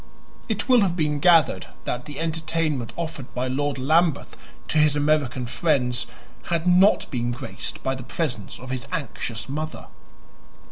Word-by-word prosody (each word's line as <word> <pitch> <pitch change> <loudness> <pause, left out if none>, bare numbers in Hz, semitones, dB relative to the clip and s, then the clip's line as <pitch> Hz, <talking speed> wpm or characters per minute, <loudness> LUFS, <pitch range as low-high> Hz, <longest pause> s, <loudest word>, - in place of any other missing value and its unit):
It 215 -2 -1
will 250 -3 +6
have 185 -4 +2
been 150 -3 0
gathered 160 - +4 0.2
that 125 0 -3
the 145 -2 -7
entertainment 160 -5 -1
offered 160 -6 -5
by 125 +1 -1
Lord 140 +2 -1
Lambeth 155 +3 +2 0.3
to 155 - +2
his 150 -1 +4
American 145 -4 +1
friends 125 -2 +1 0.4
had 170 -1 -1
not 180 +3 +5
been 120 -2 -1
graced 120 -3 -5
by 130 - 0
the 130 - -6
presence 120 - -3
of 130 +1 -8
his 130 -2 -3
anxious 135 -8 -4
mother. 155 +3 -5
145 Hz, 150 wpm, -24 LUFS, 125-165 Hz, 0.4 s, will